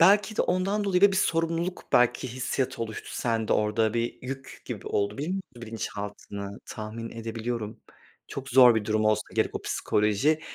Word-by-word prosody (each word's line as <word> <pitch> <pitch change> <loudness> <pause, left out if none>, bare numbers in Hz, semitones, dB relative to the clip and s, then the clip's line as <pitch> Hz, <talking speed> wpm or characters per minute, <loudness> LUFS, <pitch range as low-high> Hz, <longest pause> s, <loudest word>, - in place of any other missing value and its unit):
belki 205 +5 +5
de - - +4
ondan 195 +3 +1
dolayı 190 -2 +2
ve 200 -1 +8
bir - - 0
sorumluluk 165 0 0
belki 125 +1 +4
hissiyatı 130 0 -2
oluştu 110 -1 -6
sende 115 -2 0
orada 105 +1 +2
bir 120 0 -1
yük 135 +1 -7
gibi - - -6
oldu, 100 +4 0
biliyor 150 +4 -2
musun 195 - -2 0.2
bilinçaltını, 100 -2 -6
tahmin 110 +1 -6
edebiliyorum. 115 -1 -4 0.5
Çok 135 0 -6
zor 125 -2 +8
bir 110 -2 0
durum 110 0 +1
olsa 110 0 +3
gerek - - +1
o - - -3
psikoloji 105 +10 +1
120 Hz, 165 wpm, -27 LUFS, 110-160 Hz, 0.5 s, ve